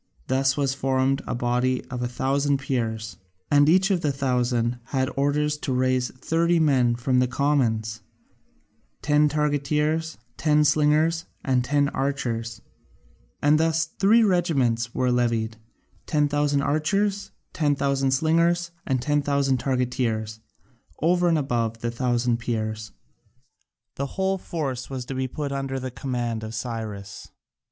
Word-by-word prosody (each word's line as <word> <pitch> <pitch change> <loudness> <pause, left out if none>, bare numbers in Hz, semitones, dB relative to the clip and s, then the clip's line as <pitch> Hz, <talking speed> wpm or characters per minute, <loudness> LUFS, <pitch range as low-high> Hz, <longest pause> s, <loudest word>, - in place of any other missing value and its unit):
Thus 135 +1 +1
was 140 -2 +1
formed 135 0 0
a - - -2
body 125 +1 0
of 125 -1 -4
a 125 - 0
thousand 140 +3 0
Peers: 110 -6 -3 0.3
and 145 +1 +5
each 190 +4 +4
of 180 -3 +1
the 150 -4 +1
thousand 125 -3 0
had 130 +2 -1
orders 150 +2 +1
to 140 - -3
raise 130 -1 +1
thirty 165 +6 +1
men 130 -6 +3
from 125 +2 +1
the 125 - +3
commons 115 -6 0 1.0
ten 150 0 +3
targeteers, 150 +2 0 0.2
ten 150 -1 +3
slingers, 155 +3 +2 0.2
and 130 -2 +2
ten 145 +2 +2
archers 115 -5 -3 0.8
and 150 +1 +4
thus 160 0 +2
three 220 +4 +5
regiments 135 - +1
were 125 -1 +1
levied, 115 -2 0 0.5
10,000 145 -1 +1
archers, 195 +8 0 0.2
10,000 140 -3 +1
slingers, 170 +5 +2 0.2
and 130 -3 0
10,000 140 -2 +1
targeteers, 125 -4 -1 0.6
over 175 +3 +2
and 165 -2 +3
above 115 -5 -1
the 120 - -2
thousand 120 -1 0
Peers. 110 -2 -3 1.1
The 140 - -2
whole 190 0 0
force 140 -9 -4
was 130 -2 -5
to 135 - -5
be 130 0 -2
put 145 +2 -4
under 135 -1 -3
the 130 0 -5
command 120 -3 -3
of 110 +1 -6
Cyrus. 110 -4 -6
135 Hz, 130 wpm, -24 LUFS, 120-150 Hz, 1.1 s, and